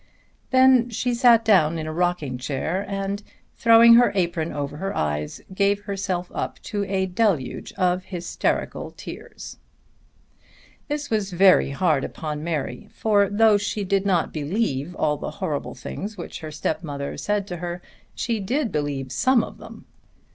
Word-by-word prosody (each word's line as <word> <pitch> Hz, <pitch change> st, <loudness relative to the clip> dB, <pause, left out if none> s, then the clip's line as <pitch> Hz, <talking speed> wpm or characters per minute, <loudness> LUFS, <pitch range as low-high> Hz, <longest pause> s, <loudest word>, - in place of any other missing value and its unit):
Then 260 Hz, -2 st, +5 dB
she 245 Hz, +2 st, -1 dB
sat 235 Hz, -2 st, +5 dB
down 170 Hz, -7 st, +4 dB
in 155 Hz, -, -4 dB
a 155 Hz, -, -4 dB
rocking 165 Hz, -7 st, -1 dB
chair 155 Hz, +8 st, -2 dB
and 195 Hz, 0 st, -3 dB, 0.3 s
throwing 230 Hz, 0 st, +7 dB
her 240 Hz, +1 st, +6 dB
apron 170 Hz, -3 st, 0 dB
over 145 Hz, 0 st, -4 dB
her 195 Hz, +4 st, -3 dB
eyes 75 Hz, 0 st, -2 dB
gave 200 Hz, +1 st, +2 dB
herself 190 Hz, -3 st, -3 dB
up -, -, -3 dB
to 205 Hz, -1 st, -2 dB
a 190 Hz, -1 st, 0 dB
deluge 185 Hz, -, -1 dB
of 180 Hz, 0 st, 0 dB
hysterical 175 Hz, -2 st, -2 dB
tears. -, -, -9 dB, 1.3 s
This 295 Hz, -2 st, -4 dB
was 210 Hz, -3 st, 0 dB
very 185 Hz, -2 st, +5 dB
hard 140 Hz, -1 st, +1 dB
upon 150 Hz, -1 st, -5 dB
Mary 170 Hz, +6 st, -3 dB
for 205 Hz, -3 st, +2 dB
though 210 Hz, 0 st, +4 dB
she 205 Hz, 0 st, -2 dB
did 195 Hz, 0 st, +1 dB
not 175 Hz, -4 st, +1 dB
believe 155 Hz, -, -2 dB
all 150 Hz, -1 st, +1 dB
the -, -, -5 dB
horrible 145 Hz, -2 st, -3 dB
things 210 Hz, +2 st, -6 dB
which 175 Hz, -, -7 dB
her 155 Hz, -, -7 dB
stepmother 150 Hz, -2 st, -3 dB
said 205 Hz, -1 st, -1 dB
to 175 Hz, -, -4 dB
her 175 Hz, +1 st, -5 dB, 0.4 s
she 230 Hz, -3 st, -1 dB
did 245 Hz, +6 st, -1 dB
believe 145 Hz, -3 st, -2 dB
some 255 Hz, -, +3 dB
of -, -, -9 dB
them. -, -, -12 dB
185 Hz, 155 wpm, -23 LUFS, 155-210 Hz, 1.3 s, throwing